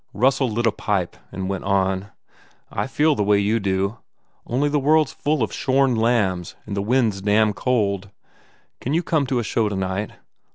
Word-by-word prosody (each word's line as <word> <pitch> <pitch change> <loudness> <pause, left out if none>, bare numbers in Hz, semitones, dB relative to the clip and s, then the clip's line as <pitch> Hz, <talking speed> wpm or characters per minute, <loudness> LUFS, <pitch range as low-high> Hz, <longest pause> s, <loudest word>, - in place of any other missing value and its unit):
Russell 130 +4 +2
lit 115 +2 -1
a 115 - +4
pipe 100 -4 -2 0.2
and 95 0 -4
went 95 -1 -3
on, 95 0 0 0.6
"I - - -2
feel 150 +3 +2
the 120 - -2
way 105 0 +3
you 105 +3 +1
do. 100 +2 -1 0.5
Only 130 +5 +1
the 145 0 +1
world 150 +1 +3
s - - -11
full 150 -3 0
of 110 - -3
shorn 135 -1 +2
lambs 110 -7 +1
and 100 - -5
the 100 - -1
wind 115 +1 +2
s 95 - -8
damned 105 +1 +2
cold.... 100 -6 0 0.7
Can 140 +5 -2
you 170 - +1
come 150 -6 +1
to 130 - 0
a 120 - 0
show 110 0 0
tonight?" 95 +1 -3
110 Hz, 195 wpm, -22 LUFS, 100-130 Hz, 0.7 s, a